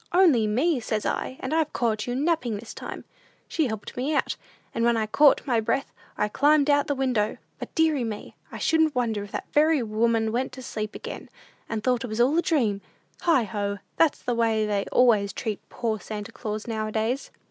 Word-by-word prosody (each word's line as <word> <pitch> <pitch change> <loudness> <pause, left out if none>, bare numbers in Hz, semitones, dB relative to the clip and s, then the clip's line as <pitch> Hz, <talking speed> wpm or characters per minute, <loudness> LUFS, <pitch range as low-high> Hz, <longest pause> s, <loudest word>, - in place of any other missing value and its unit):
'Only 330 - +5
me,' 265 +8 +2
says 215 -2 -2
I; 260 - -2
'and 260 - -3
I've 315 -2 +1
caught 220 -2 0
you 245 - -1
napping 280 -6 0
this 220 +2 -9
time!' - - -7 0.4
She 315 -4 0
helped 220 -3 -6
me 275 +5 -1
out, - - 0 0.4
and 230 - -1
when 235 0 +3
I - - +1
had 215 0 -3
caught 290 -1 +5
my 240 -5 +2
breath, 245 +5 -1 0.2
I 210 - +1
climbed 290 +5 +3
out 285 0 +3
the 285 - 0
window; 250 -6 0 0.2
but, - - -8
deary 315 -5 +3
me, 215 -2 -6 0.2
I - - -6
shouldn't 320 -2 +2
wonder 225 -4 0
if 205 - -10
that - - -3
very 300 -2 +4
woman 225 0 +1
went 255 +3 -1
to 260 0 -8
sleep 215 -2 -4
again, - - -7 0.4
and 220 -1 -3
thought 250 -1 +1
it - - -3
was 215 0 -4
all 255 +6 +4
a - - +4
dream! 230 - +1 0.4
Heigh 325 -8 +4
ho! 200 -1 -3 0.2
that's 325 -3 +2
the 245 - 0
way 225 -2 +2
they 205 -2 0
always 215 -5 +4
treat 215 -1 -3
poor 220 -3 -2
Santa 210 -1 -6
Claus 215 0 -5
nowadays." 220 +3 -2
235 Hz, 205 wpm, -26 LUFS, 215-280 Hz, 0.4 s, Only